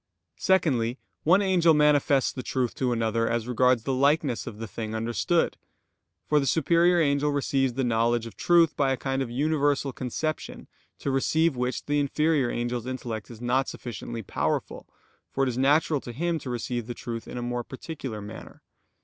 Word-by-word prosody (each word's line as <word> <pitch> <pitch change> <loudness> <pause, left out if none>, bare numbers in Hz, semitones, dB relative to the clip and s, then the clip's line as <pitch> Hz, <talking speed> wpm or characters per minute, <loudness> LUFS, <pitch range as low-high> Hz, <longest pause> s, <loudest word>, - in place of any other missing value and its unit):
Secondly, 130 -10 +2 0.2
one 185 +6 +4
angel 175 -4 +4
manifests 145 -2 +3
the 130 - -6
truth 125 -2 -1
to 130 -2 -1
another 115 0 0
as 115 0 -1
regards 125 -1 +3
the 135 - -1
likeness 140 -1 +1
of 110 -3 -7
the 115 - -5
thing 110 +3 -5
understood. 120 +10 0 0.7
For 150 - +3
the 140 - -1
superior 170 +5 +3
angel 145 -1 +2
receives 135 -2 0
the 135 +2 -1
knowledge 120 0 +1
of 115 - -9
truth 170 -3 +4
by 135 -2 +2
a 130 - 0
kind 135 +1 -2
of 130 - -2
universal 145 +1 0
conception, 150 +6 -4 0.3
to 140 - -2
receive 155 +3 +2
which 125 +1 -2
the 145 0 +1
inferior 145 -1 +1
angel's 120 0 -3
intellect 120 -4 -5
is 115 -1 -11
not 125 +2 +1
sufficiently 115 0 -6
powerful, - - -2 0.4
for 135 - -1
it 135 - +2
is 120 - -3
natural 145 +1 +3
to 120 - -7
him 170 +5 -1
to 135 - -7
receive 120 -1 -3
truth 115 -1 -6
in - - -7
a 120 - -3
more 120 0 -2
particular 130 -4 -7
manner. 105 +2 -10
130 Hz, 175 wpm, -26 LUFS, 120-150 Hz, 0.7 s, one